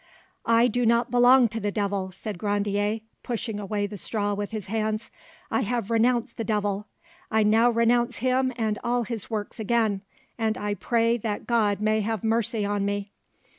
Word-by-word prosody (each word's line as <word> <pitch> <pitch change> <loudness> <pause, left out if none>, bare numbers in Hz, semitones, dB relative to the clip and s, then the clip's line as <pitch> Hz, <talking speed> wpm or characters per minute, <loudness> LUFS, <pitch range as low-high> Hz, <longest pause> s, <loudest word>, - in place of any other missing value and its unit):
"I 230 +1 +5
do 245 +1 0
not 235 +1 +2
belong 245 +1 +6
to 225 +1 -4
the 205 -1 -1
devil," 200 -2 -2
said 195 0 -7
Grandier, 205 +1 0 0.2
pushing 225 -3 -3
away 205 0 -2
the 205 0 -6
straw 205 +1 -2
with 205 0 -3
his 215 -3 -5
hands; 215 +1 -2 0.4
"I - - +2
have 230 -1 -2
renounced 235 +1 +2
the 230 - -2
devil, 205 -1 -1 0.4
I 220 0 +3
now 225 +3 +4
renounce 235 +1 +2
him 255 +1 +1
and 220 -3 -1
all 240 0 +1
his 225 -3 -5
works 215 0 -4
again, 220 -2 +1 0.4
and 220 -1 0
I 205 0 -2
pray 230 +4 +1
that 210 -2 -4
God 210 -4 +1
may 215 0 +2
have 220 -1 -2
mercy 225 -1 0
on 205 0 -1
me." 200 0 -2
220 Hz, 175 wpm, -26 LUFS, 205-235 Hz, 0.4 s, belong